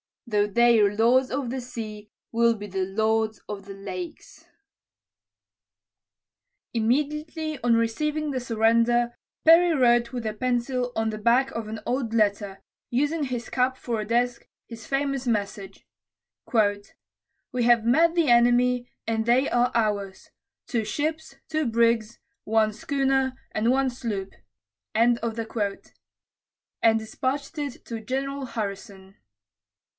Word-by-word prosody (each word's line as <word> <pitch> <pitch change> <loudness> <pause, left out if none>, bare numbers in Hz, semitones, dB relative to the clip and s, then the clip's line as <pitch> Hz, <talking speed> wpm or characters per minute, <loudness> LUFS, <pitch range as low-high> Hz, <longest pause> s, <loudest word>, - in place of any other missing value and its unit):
Though 210 -3 +1
they're 220 -2 +4
lords 250 +4 +3
of 265 -2 -2
the 260 +2 -3
sea, 215 -4 -7 0.2
we'll 235 0 +3
be 205 -1 -7
lords 220 +3 0
of 200 -2 -6
the 200 - -8
lakes." 315 - -8 2.3
Immediately 300 +6 -1
on 235 -1 +3
receiving 300 +7 0
the 260 - -1
surrender, 235 +1 +2 0.3
Perry 330 +1 +6
wrote 240 -2 +3
with 240 -2 -4
a 215 - -1
pencil 245 +2 -1
on 225 0 0
the 215 - -4
back 240 +5 +2
of 230 -2 -5
an 220 +1 -6
old 245 -3 -2
letter, 205 -2 0 0.3
using 290 +5 0
his 245 -2 -4
cap 255 0 0
for 235 -4 -3
a 215 - -3
desk, 240 +2 0 0.2
his 230 -1 -10
famous 275 -1 -1
message, 200 -3 -3 1.7
"We 250 -1 -1
have 235 -1 +4
met 325 +8 +4
the 335 -5 +2
enemy 245 +1 +3 0.2
and 225 0 -1
they 245 +3 +3
are 245 +1 +2
ours 205 -4 -1 0.3
two 225 -3 -1
ships, 305 +5 -3
two 310 -3 0
brigs, 230 -1 +1 0.3
one 220 0 +2
schooner, 270 +2 0 0.2
and 215 +2 0
one 265 +1 +2
sloop," 220 -6 -5 0.6
and 235 +1 +4 1.6
dispatched 255 +7 0
it 285 -4 -5
to 230 -1 -5
General 270 +4 -3
Harrison. 200 -4 -6
235 Hz, 125 wpm, -25 LUFS, 220-265 Hz, 2.3 s, Perry